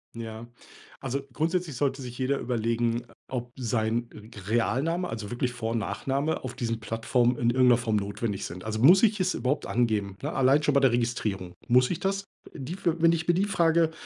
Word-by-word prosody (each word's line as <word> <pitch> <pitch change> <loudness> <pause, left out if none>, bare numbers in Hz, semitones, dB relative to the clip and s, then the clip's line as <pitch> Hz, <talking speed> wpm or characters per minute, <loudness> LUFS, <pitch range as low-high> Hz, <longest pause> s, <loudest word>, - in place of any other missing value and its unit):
Ja. 115 0 -7 0.5
Also 135 +1 -2
grundsätzlich 165 +1 -1
sollte 135 +1 -1
sich 125 -1 -8
jeder 135 +1 0
überlegen, 115 0 -1 0.2
ob 125 -2 -4
sein 115 -1 -1
g 110 0 -12
Realname, 135 - 0
also 110 -2 -5
wirklich 125 0 -1
Vor 115 -2 -3
und 115 - 0
Nachname 135 +8 -2
auf 125 - -6
diesen 115 -3 -2
Plattformen 120 +2 +1
in 120 -1 +1
irgend 130 +1 +4
'ner 120 - +6
Form 115 -3 -1
notwendig 100 0 -3
sind. 90 +2 -7
Also 110 0 -3
muss 175 - +7
ich 215 -2 +3
es 185 0 +1
überhaupt 130 +5 -1
angeben, 105 -5 0
ne? - - -2
Allein 135 +3 +3
schon 145 - +2
bei 140 - +5
der 135 - +5
Registrierung. 110 -6 -2
Muss 125 +1 +4
ich 175 - -2
das, 195 +1 -1 0.3
äh - - -10
die 135 +5 -5
für, 170 -3 -1
wenn 165 0 +6
ich 165 0 -2
mir 175 - +4
die 190 +3 +2
Frage 165 -4 +2
125 Hz, 205 wpm, -27 LUFS, 115-150 Hz, 0.5 s, muss